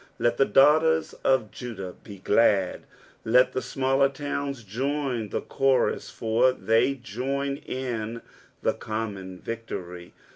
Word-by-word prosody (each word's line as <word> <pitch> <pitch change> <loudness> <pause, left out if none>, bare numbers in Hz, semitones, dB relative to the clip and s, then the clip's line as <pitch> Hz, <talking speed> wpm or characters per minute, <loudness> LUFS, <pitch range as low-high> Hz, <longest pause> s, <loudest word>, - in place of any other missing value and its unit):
" - - -36
Let 120 - +1
th« 135 - +4
daughteft 155 +6 +4
tf 130 -6 +2
Jvidnik 105 -7 -8
Ae 100 - -8
glait 100 -4 +3 0.2
' - - -25
' - - -32
let 125 +3 +4
the 130 - -1
smaller 135 +1 +1
towns 140 -2 -4
joiD 125 +1 -2
the - - -2
chorus, 135 -2 +1
^r 120 +3 +2
the 115 +5 +2
j - - -18
join 140 +5 -2
in 120 -4 -4 0.4
the - - +2
com 110 -1 -4
mon 95 -1 -9
victory. 90 -5 -7
125 Hz, 150 wpm, -26 LUFS, 110-135 Hz, 0.4 s, th